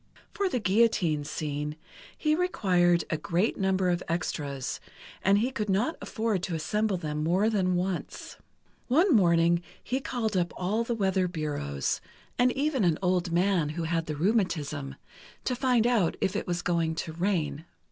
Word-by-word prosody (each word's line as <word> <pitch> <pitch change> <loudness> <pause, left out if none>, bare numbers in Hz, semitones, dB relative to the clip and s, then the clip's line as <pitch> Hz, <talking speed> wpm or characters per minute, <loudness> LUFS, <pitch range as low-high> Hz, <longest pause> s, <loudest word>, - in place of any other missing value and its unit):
For 400 -2 0
the 255 - -1
guillotine 190 -7 +2
scene, 150 0 -3 0.4
he 305 -1 +1
required 180 - +2
a 155 - +1
great 175 +8 0
number 190 -1 +1
of 175 0 0
extras, 145 -5 -3 0.4
and 195 +1 +4
he 240 +5 +1
could 210 -5 -3
not 215 +12 +1
afford 220 -5 -1
to 175 -2 -3
assemble 210 +5 0
them 150 -2 -3
more 190 +7 +2
than 185 -4 +1
once. 180 0 -3 0.5
One 315 +5 +4
morning 170 -3 +4 0.2
he 255 +2 -1
called 235 -6 -2
up 175 -1 0
all 205 +6 0
the 235 0 -2
weather 190 -3 +1
bureaus, 145 - -2 0.4
and 250 +1 +5
even 275 -4 0
an 170 -4 +3
old 180 -1 +1
man 175 -3 +2
who 165 +2 -3
had 165 0 -1
the 155 - -3
rheumatism, 155 -7 0 0.5
to 250 - -1
find 250 -3 +2
out 230 -9 +2
if 190 - 0
it - - -2
was 175 -1 -2
going 165 -2 0
to 160 0 -4
rain. 160 -4 -1
180 Hz, 165 wpm, -28 LUFS, 165-220 Hz, 0.5 s, and